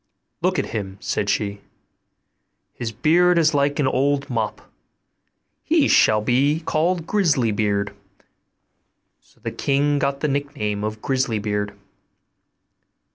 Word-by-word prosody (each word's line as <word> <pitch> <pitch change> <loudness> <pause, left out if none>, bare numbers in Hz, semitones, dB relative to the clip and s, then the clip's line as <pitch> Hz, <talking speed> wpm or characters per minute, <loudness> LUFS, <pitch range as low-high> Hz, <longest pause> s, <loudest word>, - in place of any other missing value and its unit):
'Look - - +1
at - - -2
him,' 100 -3 -4
said 100 -1 -2
she; 100 0 -1 1.1
'his 115 -2 -5
beard 175 +9 +3
is 160 -1 +3
like 140 0 +1
an 145 - +2
old 140 +2 0
mop; 110 -3 -3 1.0
he - - +3
shall 110 0 +4
be 140 +8 +2
called 165 +2 0
Grisly 160 - +2
beard.' 105 -1 -1 1.3
So - - -29
the - - -4
king 145 +1 +1
got 140 0 -1
the 150 - +1
nickname 140 -8 -2
of 110 0 -4
Grisly 130 -4 0
beard. 105 -1 -2
130 Hz, 125 wpm, -22 LUFS, 105-145 Hz, 1.3 s, shall